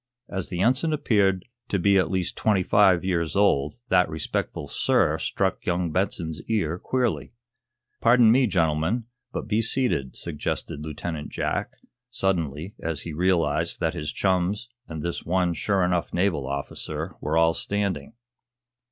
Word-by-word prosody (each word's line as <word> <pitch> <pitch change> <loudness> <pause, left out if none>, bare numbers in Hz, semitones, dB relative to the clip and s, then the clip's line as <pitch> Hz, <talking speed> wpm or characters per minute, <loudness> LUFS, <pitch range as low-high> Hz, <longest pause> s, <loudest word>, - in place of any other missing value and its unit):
As 95 -3 -4
the 90 0 -2
Ensign 130 +9 +2
appeared 100 -10 +2 0.2
to 100 - +1
be 100 +2 +3
at 90 - +1
least 95 -2 -1
twenty 100 -4 +2
five 95 -2 +4
years 85 -3 0
old 75 -7 +3 0.2
that 90 -1 +4
respectful 80 -1 -3
"sir" - - +2
struck - - -1
young 90 -1 0
Benson's 80 -3 -1
ear 90 -6 0
queerly. 125 -1 -1 0.7
"Pardon 115 -1 +6
me, 130 +1 +4
gentlemen, 85 +4 +1 0.3
but - - -4
be 110 0 +2
seated," 115 - +1
suggested 75 -2 -3
Lieutenant 75 +1 -5
Jack, - - -2 0.4
suddenly, 85 - -1
as 80 -3 -3
he 85 - -6
realized 85 -2 +1
that 80 -1 0
his 75 -4 -3
chums 95 +4 0 0.2
and 80 -2 -6
this 85 0 -3
one 90 0 +1
sure 95 +2 +1
enough 90 -1 0
naval 85 -7 +1
officer 70 0 -4
were 75 +2 0
all 80 0 +4
standing. 100 -4 -2
90 Hz, 145 wpm, -25 LUFS, 80-100 Hz, 0.7 s, Pardon